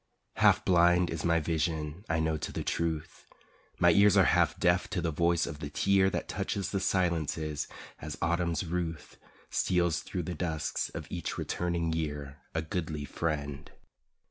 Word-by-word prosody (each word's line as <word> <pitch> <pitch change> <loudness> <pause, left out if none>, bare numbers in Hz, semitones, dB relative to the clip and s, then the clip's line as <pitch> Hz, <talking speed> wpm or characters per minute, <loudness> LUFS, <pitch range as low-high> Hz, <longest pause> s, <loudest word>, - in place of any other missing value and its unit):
Half - - +4
blind 90 0 +4
is 80 -1 -3
my 85 -1 +3
vision 80 +1 -2
I 80 0 +1
know 80 0 +1
to 75 - -4
the - - -4
truth, 80 -2 -3 0.5
My 85 - +5
ears 100 +3 +5
are - - +7
half - - +3
deaf 90 +1 +2
to 110 - -2
the 85 -1 -1
voice 85 +2 +2
of 75 - -6
the 70 - -5
tear 95 +5 +3
That - - -3
touches 95 0 -2
the 100 - 0
silences 80 -5 0 0.3
as 75 0 -6
Autumn's 85 +1 0
ruth 85 -2 -4 0.3
Steals 85 -2 +1
thru 90 - -4
the 90 - -4
dusks 80 -2 -2
of - - -7
each - - -4
returning 85 -2 -1
year 75 -3 -4 0.2
A 80 - 0
goodly 80 -3 -3
friend. 75 -2 -3
85 Hz, 165 wpm, -30 LUFS, 75-90 Hz, 0.5 s, are